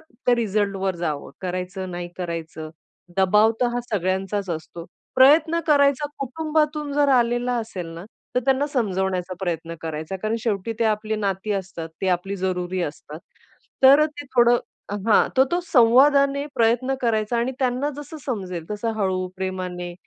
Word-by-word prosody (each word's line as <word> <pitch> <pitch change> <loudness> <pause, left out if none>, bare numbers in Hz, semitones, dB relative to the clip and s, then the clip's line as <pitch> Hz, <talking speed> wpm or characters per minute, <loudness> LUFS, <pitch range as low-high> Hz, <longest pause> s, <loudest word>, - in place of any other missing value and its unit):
त्या 245 -4 -1
रिझल्टवर 200 -4 0
जावं. 155 -4 -3
करायचं, 185 0 -4
नाही 175 0 -5
करायचं. 165 -3 -5 0.5
दबाव 210 +4 +4
तर 250 - +4
हा 245 - 0
सगळ्यांचाच 190 0 -1
असतो 165 +1 -6 0.3
प्रयत्न 310 +5 +5
करायचा. 285 -1 +3
कुटुंबातून 300 +1 -1
जर 290 0 +3
आलेला 245 -1 +2
असेल 220 -6 -5
ना, 170 +2 -8 0.3
तर 250 - +3
त्यांना 270 +2 +2
समजावण्याचा 190 -8 -1
प्रयत्न 170 -2 -3
करायचा. 160 +3 -4
कारण 215 +1 0
शेवटी 215 -1 -1
ते 230 - +2
आपली 215 0 0
नाती 200 0 -2
असतात. 190 -4 -4
ते 190 - 0
आपली 185 +2 -1
जरुरी 185 -1 -2
असतात. 150 0 -6 0.6
तर 275 +3 +8
ते 290 -1 -9
थोडं 240 0 +6 0.5
हां. 220 - +5
तर 260 - +6
तो 350 - +3
संवादाने 275 +3 +5
प्रयत्न 240 +3 +2
करायचा 225 -1 0
आणि 240 +3 0
त्यांना 255 +1 0
जसं 295 +2 -8
समजेल 185 - -4
तसं 210 +2 -2
हळू, 190 -3 0
प्रेमाने 185 -2 -4
210 Hz, 145 wpm, -23 LUFS, 185-260 Hz, 0.6 s, तर